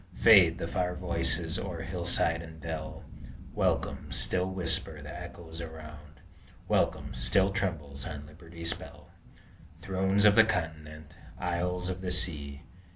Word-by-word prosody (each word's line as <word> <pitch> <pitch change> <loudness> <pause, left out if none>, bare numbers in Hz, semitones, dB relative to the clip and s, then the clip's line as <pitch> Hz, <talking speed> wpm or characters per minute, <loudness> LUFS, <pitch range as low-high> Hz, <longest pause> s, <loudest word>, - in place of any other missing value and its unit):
Fade 95 -8 +7
the 85 - -3
far 90 +1 -1
voices 85 -2 0
o'er 85 -4 -4
hillside 85 -1 +2
and 80 -1 -11
dell; 80 -1 -5 0.5
Welcome! - - 0
still 90 0 +1
whisper 90 -3 -1
the - - -8
echoes 80 -1 -8
around; 75 -2 -10 0.5
Welcome! - - +1
still 95 +11 +2
trembles 80 -8 -3
on 75 -2 -6
Liberty's 85 +2 -6
bell! - - -12 0.7
Thrones 95 +3 +1
of 105 - +8
the 115 - +8
continent! 80 -6 -4 0.2
isles 90 +1 -1
of 95 0 -4
the 95 - -3
sea! 75 -5 -1
85 Hz, 130 wpm, -30 LUFS, 80-90 Hz, 0.7 s, of